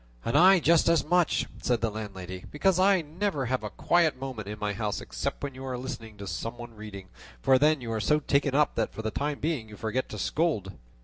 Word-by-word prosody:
"And 115 - -1
I 185 +4 +7
just 165 +1 +4
as 170 -1 +3
much," 175 +1 +2 0.2
said 120 -2 +1
the 115 -1 0
landlady, 95 -4 -7
"because 185 +4 +2
I 190 -2 +4
never 155 -2 -2
have 130 -1 -1
a 105 - -3
quiet 165 -1 +2
moment 130 -6 -5
in 105 +1 -5
my 105 -1 -2
house 105 0 -2
except - - -4
when 140 -1 -3
you 130 +1 -9
are 130 -1 -3
listening 115 -4 -7
to 100 - -7
some 115 +6 -4
one 120 -1 -9
reading; 105 -3 -9 0.3
for 130 - +4
then 150 0 +3
you 115 -2 -5
are 110 -1 -1
so 150 +9 +3
taken 140 -2 +1
up 150 0 +3
that 115 - -1
for 110 - -5
the 110 - -1
time 145 +3 -2
being 145 -8 -2
you 105 - -11
forget 120 +4 -2
to 105 - -6
scold." 105 - 0
130 Hz, 235 wpm, -28 LUFS, 110-150 Hz, 0.3 s, I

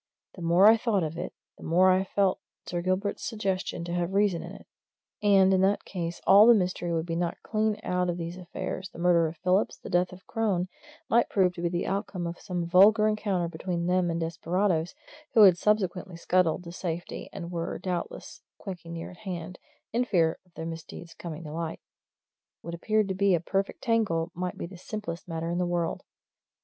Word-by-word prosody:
The 180 - -11
more 170 +3 +4
I 220 +2 +8
thought 215 -5 +1
of 155 0 -3
it, 175 - -4 0.3
the - - -11
more 185 +3 +4
I 185 +1 +3
felt 195 0 +1 0.3
Sir 175 -1 -3
Gilbert's 185 +3 -1
suggestion 195 -6 -2
to 170 0 -4
have 175 +2 -1
reason 200 -4 +2
in - - -8
it. - - -12 0.6
And 195 -2 +5
in 185 - +3
that 195 +2 +2
case 170 -2 -4
all 205 +3 +8
the 240 - +8
mystery 180 -3 -1
would 165 -1 0
be 165 -1 -3
knocked 170 0 -2
clean 215 -1 0
out 180 0 0
of 175 - -2
these 170 0 -5
affairs 185 +1 -5
the - - -14
murder 170 -1 +3
of 160 +1 -7
Phillips, 185 +5 +1
the - - -10
death 180 +1 +2
of 185 +1 -13
Crone, 200 -6 -1 0.4
might 235 +1 +3
prove 185 -3 +2
to 170 - -7
be 170 - +1
the 175 0 -2
outcome 195 -2 -3
of 170 +1 -5
some 180 -2 -3
vulgar 205 +5 +6
encounter 205 -5 0
between 170 +1 -3
them 180 0 +2
and 165 0 -1
desperadoes 170 - 0 0.4
who 220 - +9
had 190 -3 +8
subsequently 190 -4 0
scuttled 180 0 +1
to 170 - -8
safety 175 -1 -5
and 175 -3 -7
were 170 -1 -3
doubtless 180 -1 -5 0.2
quaking 175 -4 -8
near 165 0 -6
at 180 - -14
hand, 180 -3 -6 0.3
in 240 +2 +2
fear 170 -9 +1
of 175 - -31
their 160 - -5
misdeeds 165 +1 -8
coming 165 -1 -7
to 150 - -7
light; 165 0 -4 0.8
what 170 - -6
appeared 215 +4 +1
to 190 - -1
be 195 0 +3
a - - 0
perfect 195 +4 -2
tangle 200 -8 +1
might 180 0 -4
be - - -4
the 175 0 -11
simplest 185 -5 -6
matter 165 0 -3
in 175 - -1
the - - +2
world. 175 -1 -1
180 Hz, 205 wpm, -28 LUFS, 170-195 Hz, 0.8 s, who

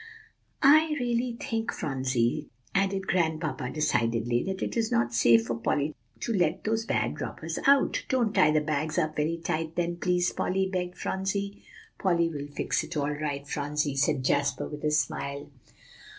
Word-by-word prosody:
"I 305 +2 +6
really 240 0 -1
think, 225 -1 -2
Phronsie," 130 +1 -1 0.2
added 195 0 +1
Grandpapa 160 -8 0
decidedly, 120 -5 +1
"that 190 0 -3
it - - -3
is 225 -1 0
not 120 +1 +1
safe 115 -1 +5
for 115 - -2
Polly 145 +6 0 0.3
to 230 - -1
let 180 -4 +1
those 225 +1 0
bad - - -1
robbers - - -4
out." 280 0 +4
"Don't 240 -5 +1
tie 155 - +5
the 155 0 +3
bags 155 +1 -2
up 155 -3 0
very 155 +3 0
tight, 160 -1 -3
then, 175 0 -1
please, 180 0 +1
Polly," 190 +1 0
begged 180 -1 -3
Phronsie. 200 +1 -2 0.4
"Polly 170 -3 +2
will 145 -3 -5
fix 145 - -1
it - - -6
all 145 0 0
right, 145 -1 -4
Phronsie," 145 0 -1
said 135 -1 +1
Jasper, 140 -1 +1
with 150 -1 -8
a 150 - +2
smile. 140 -1 -1
155 Hz, 165 wpm, -28 LUFS, 140-190 Hz, 0.4 s, I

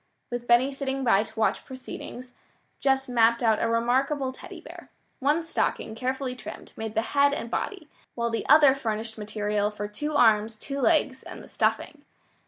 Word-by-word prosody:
With 240 0 -4
Benny 240 +3 +4
sitting 270 -1 -3
by 205 -5 +4
to 220 - -8
watch 220 - +1
proceedings, 255 -1 -9 0.5
Jess 270 -1 +1
mapped 235 -1 +3
out 220 -2 +3
a - - +2
remarkable 260 +4 +1
Teddy - - -11
bear. - - -12 0.3
One 295 +4 +1
stocking, 325 -8 -2
carefully 255 +2 -3
trimmed, - - -10
made 220 0 -5
the 220 - +2
head 285 0 +4
and 235 - -6
body, 385 -8 -3 0.3
while 235 -1 -1
the 230 - -3
other 290 -3 +8
furnished 220 -4 -4
material 210 0 -1
for 210 0 -5
two 295 +9 -4
arms, 220 -4 +4
two 275 +5 -5
legs, 265 -3 +2
and - - -10
the - - -13
stuffing. - - -1
245 Hz, 175 wpm, -26 LUFS, 225-275 Hz, 0.5 s, other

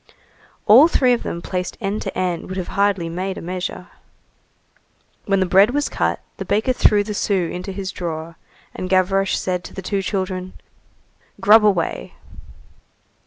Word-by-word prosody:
All 245 +9 +8
three 255 -7 +3
of 240 - -1
them 170 - -5
placed 180 -1 -4
end 205 0 -2
to - - -5
end 180 -2 -2
would 185 - -6
have 185 - -4
hardly 200 -4 +1
made 185 +3 -4
a - - -5
measure. 180 +1 -5 1.4
When 195 -1 +2
the 190 - +2
bread 195 +7 +4
was 290 0 0
cut, - - -1 0.2
the - - -4
baker 220 +5 +1
threw 210 -4 +3
the 210 +1 -5
sou 195 -4 0
into 180 +2 -5
his 190 0 -5
drawer, 165 -2 -5 0.4
and 185 - -5
Gavroche 190 +1 +2
said 180 -1 -2
to - - -10
the 190 - -6
two 195 +2 -1
children:— 185 -1 -3 0.9
"Grub 215 +1 +6
away." 195 -6 0
190 Hz, 165 wpm, -20 LUFS, 180-205 Hz, 1.4 s, All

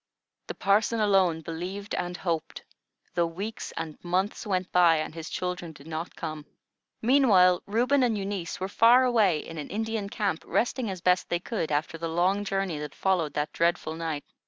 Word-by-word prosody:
The - - -5
parson 215 +3 +2
alone 190 -6 +3
believed 180 +5 -5
and 180 0 -2
hoped, 170 -4 -3 0.5
though 170 -1 +2
weeks 200 +7 -6
and 160 -2 -6
months 185 +5 -1
went 185 -2 -1
by, 175 -2 +5
and 155 0 -3
his 160 -1 -7
children 180 -2 -4
did 140 -1 -15
not 160 +1 -5
come. 155 -2 -6 0.6
Meantime, 210 -9 +5
Reuben 245 +7 +2
and 235 -4 +2
Eunice 195 -3 -4
were 190 - -2
far 235 +5 +5
away 220 -9 +3
in 165 -1 -7
an 145 - -6
Indian 220 -1 -2
camp, 200 -6 -2
resting 245 -1 0
as 185 -2 -5
best 180 +1 +2
they 175 - 0
could, 175 -4 -3
after 160 +3 -1
the 165 0 -3
long 185 +5 +1
journey 195 -5 -2
that 150 0 -7
followed 175 -6 0
that 150 0 -2
dreadful 170 -2 0
night. 160 -3 -4
180 Hz, 180 wpm, -27 LUFS, 165-205 Hz, 0.6 s, by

